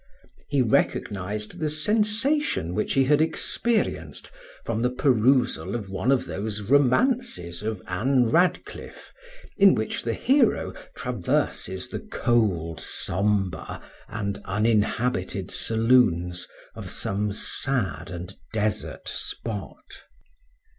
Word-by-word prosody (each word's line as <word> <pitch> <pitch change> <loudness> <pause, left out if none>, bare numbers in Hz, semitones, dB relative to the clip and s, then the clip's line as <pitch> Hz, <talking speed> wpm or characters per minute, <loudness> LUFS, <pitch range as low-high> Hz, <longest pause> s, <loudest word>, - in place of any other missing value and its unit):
He 140 -3 +2
recognized 105 -2 -1
the 155 - 0
sensation 210 - +1
which 105 - -1
he 135 - +4
had 145 +3 +4
experienced 215 +7 -1 0.3
from 110 - -1
the 125 - +2
perusal 125 -1 +2
of 100 -5 -5
one 95 +7 +1
of 135 - +2
those 105 +1 -4
romances 140 - +2
of 110 -2 -4
Anne 120 +6 +2
Radcliffe, 175 +5 -1 0.4
in 195 -1 +7
which 110 - -2
the 115 -1 -2
hero 275 +3 +2 0.2
traverses - - -1
the - - -4
cold, 110 - 0
sombre, 100 0 -1 0.3
and 100 -3 -4
uninhabited 105 -2 0
saloons 110 -7 +2 0.3
of - - -8
some 105 +1 -2
sad 100 - -2
and 90 +1 -7 0.2
desert 110 -1 -2
spot. 115 - -6
110 Hz, 105 wpm, -25 LUFS, 100-140 Hz, 0.4 s, in